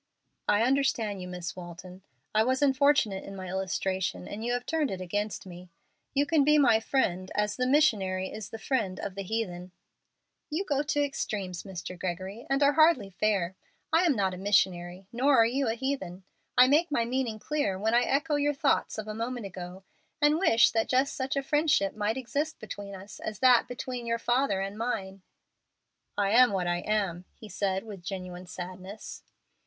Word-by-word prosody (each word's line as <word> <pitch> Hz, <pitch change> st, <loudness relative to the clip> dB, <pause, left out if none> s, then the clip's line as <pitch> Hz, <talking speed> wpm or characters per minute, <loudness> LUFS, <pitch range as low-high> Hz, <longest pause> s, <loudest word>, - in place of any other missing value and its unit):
"I 210 Hz, +2 st, +4 dB
understand 235 Hz, -6 st, +1 dB
you, 180 Hz, -, -6 dB
Miss 180 Hz, 0 st, -6 dB
Walton. 180 Hz, +1 st, -10 dB, 0.3 s
I 215 Hz, +1 st, +4 dB
was 260 Hz, +4 st, +1 dB
unfortunate 270 Hz, -7 st, +3 dB
in 195 Hz, -, -8 dB
my 185 Hz, -1 st, -6 dB
illustration, 190 Hz, -, -2 dB
and 215 Hz, +2 st, -6 dB
you 240 Hz, -, -1 dB
have 245 Hz, 0 st, -2 dB
turned 315 Hz, -3 st, 0 dB
it 190 Hz, -, -4 dB
against 205 Hz, +4 st, -3 dB
me. 180 Hz, -1 st, -11 dB, 0.5 s
You 285 Hz, +1 st, +3 dB
can 305 Hz, -1 st, +3 dB
be 300 Hz, +2 st, +5 dB
my 245 Hz, -6 st, +5 dB
friend, 185 Hz, -7 st, 0 dB
as 210 Hz, 0 st, 0 dB
the 255 Hz, 0 st, 0 dB
missionary 200 Hz, -10 st, +2 dB
is 215 Hz, -1 st, -7 dB
the 225 Hz, -, -7 dB
friend 215 Hz, -6 st, -1 dB
of 200 Hz, -, -4 dB
the 200 Hz, -, -5 dB
heathen." 185 Hz, -3 st, -4 dB, 0.8 s
"You 330 Hz, +6 st, -2 dB
go 285 Hz, -4 st, +1 dB
to 290 Hz, 0 st, 0 dB
extremes, 200 Hz, -10 st, -4 dB
Mr. 185 Hz, -2 st, -7 dB
Gregory, 190 Hz, +6 st, -5 dB
and 275 Hz, +1 st, +2 dB
are 285 Hz, +1 st, +5 dB
hardly 310 Hz, -10 st, +4 dB
fair. 190 Hz, -2 st, 0 dB, 0.4 s
I 325 Hz, -, +6 dB
am 295 Hz, -, +3 dB
not 190 Hz, -3 st, +1 dB
a -, -, -6 dB
missionary, 185 Hz, -2 st, +1 dB
nor 265 Hz, +3 st, +3 dB
are 225 Hz, -, +7 dB
you 260 Hz, +3 st, 0 dB
a 225 Hz, -, 0 dB
heathen. 230 Hz, -8 st, -4 dB, 0.3 s
I 250 Hz, -, +8 dB
make 310 Hz, +6 st, +3 dB
my 235 Hz, -5 st, +1 dB
meaning 245 Hz, -2 st, -1 dB
clear 215 Hz, -6 st, -1 dB
when 220 Hz, +4 st, 0 dB
I 240 Hz, -, +5 dB
echo 290 Hz, +4 st, +1 dB
your 290 Hz, 0 st, +1 dB
thought 275 Hz, -4 st, +1 dB
of 215 Hz, -1 st, -5 dB
a 215 Hz, -, -4 dB
moment 230 Hz, +1 st, -4 dB
ago, 185 Hz, 0 st, -8 dB, 0.4 s
and 300 Hz, +1 st, +4 dB
wish 235 Hz, -11 st, +5 dB
that 225 Hz, -1 st, 0 dB
just 265 Hz, +2 st, +2 dB
such 265 Hz, +1 st, -2 dB
a 275 Hz, -, 0 dB
friendship 295 Hz, -9 st, +2 dB
might 215 Hz, +3 st, -1 dB
exist 290 Hz, +5 st, -2 dB
between 205 Hz, -2 st, -7 dB
us 195 Hz, +2 st, -11 dB
as 215 Hz, -1 st, -5 dB
that 250 Hz, -1 st, +5 dB
between 245 Hz, -1 st, -5 dB
your 230 Hz, 0 st, +1 dB
father 240 Hz, -4 st, +1 dB
and 195 Hz, +2 st, -5 dB
mine." 195 Hz, -5 st, -3 dB, 1.0 s
"I 200 Hz, -1 st, +2 dB
am 245 Hz, -1 st, +6 dB
what 185 Hz, -2 st, 0 dB
I 175 Hz, 0 st, +1 dB
am," 190 Hz, -3 st, -1 dB
he 220 Hz, -, -12 dB
said, 190 Hz, 0 st, -1 dB
with 205 Hz, -5 st, -9 dB
genuine 180 Hz, 0 st, -6 dB
sadness. 185 Hz, +3 st, -8 dB
215 Hz, 190 wpm, -28 LUFS, 190-265 Hz, 1.0 s, I